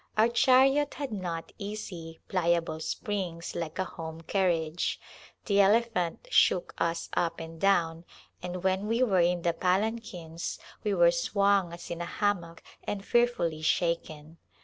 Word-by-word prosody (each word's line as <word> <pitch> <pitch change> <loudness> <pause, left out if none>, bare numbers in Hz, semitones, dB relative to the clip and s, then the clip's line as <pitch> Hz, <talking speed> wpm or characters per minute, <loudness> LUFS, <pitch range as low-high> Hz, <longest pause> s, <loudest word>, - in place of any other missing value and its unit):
Our 220 +2 +5
chariot 270 +4 +4
had 280 -4 -4
not 175 -5 -4
easy, 185 -6 -6
pliable 170 -3 0
springs 175 0 -3
like 165 -2 -4
a 190 - +1
home 160 -2 -8
carriage; 170 -2 0 0.5
the 200 -2 +4
elephant 205 -4 +1
shook 180 - +3
us 165 0 -1
up 170 - 0
and 165 0 -9
down 170 -4 +2 0.4
and 180 0 -5
when 190 +2 +1
we 230 +3 +2
were 195 -7 +3
in 175 0 +1
the 170 - +2
palanquins 180 -3 -2 0.3
we 210 -2 +1
were 170 -1 +6
swung 200 +1 +2
as 170 0 -9
in 170 0 -4
a - - -2
hammock 175 -4 -2 0.2
and 200 -1 -4
fearfully 235 -10 +1
shaken. 160 -1 -1
180 Hz, 145 wpm, -29 LUFS, 165-205 Hz, 0.5 s, were